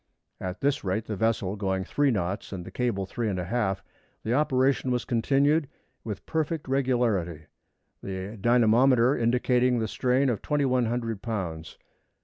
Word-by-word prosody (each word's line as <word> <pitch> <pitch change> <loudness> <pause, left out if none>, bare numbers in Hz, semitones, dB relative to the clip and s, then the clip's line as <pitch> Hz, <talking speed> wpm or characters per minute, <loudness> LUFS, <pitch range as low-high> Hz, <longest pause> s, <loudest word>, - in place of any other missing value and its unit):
At 90 0 -5
this 140 0 +1
rate 100 +3 -1
the 110 - -4
vessel 105 -2 0
going 95 -2 -1
three 145 +8 +1
knots 100 -3 -2
and 90 -3 -6
the - - -9
cable 115 -6 -1
three 115 +3 -3
and 95 - -2
a 90 - -3
half, 95 -2 -1 0.4
the 115 - -1
operation 135 -1 +2
was 125 -1 0
continued 140 +5 +2 0.3
with 105 -4 -6
perfect 160 -1 -2
regularity, 120 - 0 0.6
the 95 +2 -5
dynamometer 120 +3 +4
indicating 125 +1 +2
a 110 - -1
strain 130 +5 +1
of 115 - -1
2,100 125 -6 0
lbs. 90 -8 -5
115 Hz, 145 wpm, -27 LUFS, 100-130 Hz, 0.6 s, dynamometer